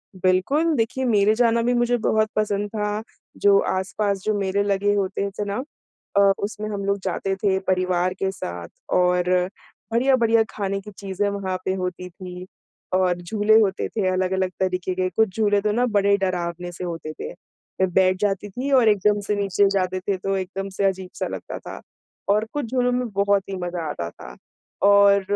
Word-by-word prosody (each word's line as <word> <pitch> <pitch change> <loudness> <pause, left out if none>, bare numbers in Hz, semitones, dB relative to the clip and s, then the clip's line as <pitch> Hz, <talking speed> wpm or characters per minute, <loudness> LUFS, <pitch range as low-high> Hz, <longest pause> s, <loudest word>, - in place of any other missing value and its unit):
बिल्कुल, 185 - +2
देखिए 240 +2 -1
मेरे 210 -2 +4
जाना 235 -1 +3
भी 245 +1 +2
मुझे 240 0 +2
बहुत 220 -1 +1
पसंद 205 -1 0
था, 210 0 -2 0.4
जो 200 -1 +5
आस-पास 195 +1 -1
जो 215 - +1
मेरे 195 +1 0
लगे 205 0 +1
होते 200 0 -1
थे - - +1
ना, 205 +6 -3 0.5
अ, - - +7 0.2
उसमें 215 +1 -4
हम 200 -1 -3
लोग 200 0 +1
जाते 195 0 -1
थे 195 -1 +1
परिवार 185 -1 +1
के 190 0 -2
साथ 85 - -6 0.3
और 180 0 +3 0.6
बढ़िया-बढ़िया 235 -2 +4
खाने 195 -1 -2
की 210 +1 -11
चीज़ें 200 +1 -2
वहाँ 195 -2 -3
पे 190 - +1
होती 180 -1 -4
थी। 180 0 -9 0.5
और 180 -1 +2
झूले 210 +4 +3
होते 200 -3 +1
थे 205 -4 -1
अलग-अलग 185 0 0
तरीके 185 -1 -1
के, 185 0 0
कुछ 195 +2 0
झूले 205 -2 +3
तो 210 - +1
ना 245 +4 +2
बड़े 200 0 +4
डरावने 175 -2 -2
से 175 +1 -8
होते 165 -3 -5
थे, 475 - -5
मैं 190 - -5
बैठ 185 0 +4
जाती 205 0 0
थी 255 +8 -4
और 255 -4 +5
एकदम 210 0 +3
से 210 - +1
नीचे 200 0 +2
जाते 185 -1 0
थे 190 +1 -2
तो 195 +1 -2
एकदम 195 +1 -4
से 195 +1 -1
अजीब 190 -1 -1
सा - - -1
लगता - - -6
था। - - -8 0.5
और 210 +2 +3
कुछ 290 -3 -2
झूलों 250 -1 +2
में 250 0 0
बहुत 200 0 +2
ही 195 - -3
मज़ा 175 -1 -4
आता 85 -12 -4
था 60 -6 -12 0.5
और 200 0 +6
200 Hz, 185 wpm, -23 LUFS, 185-210 Hz, 0.6 s, अ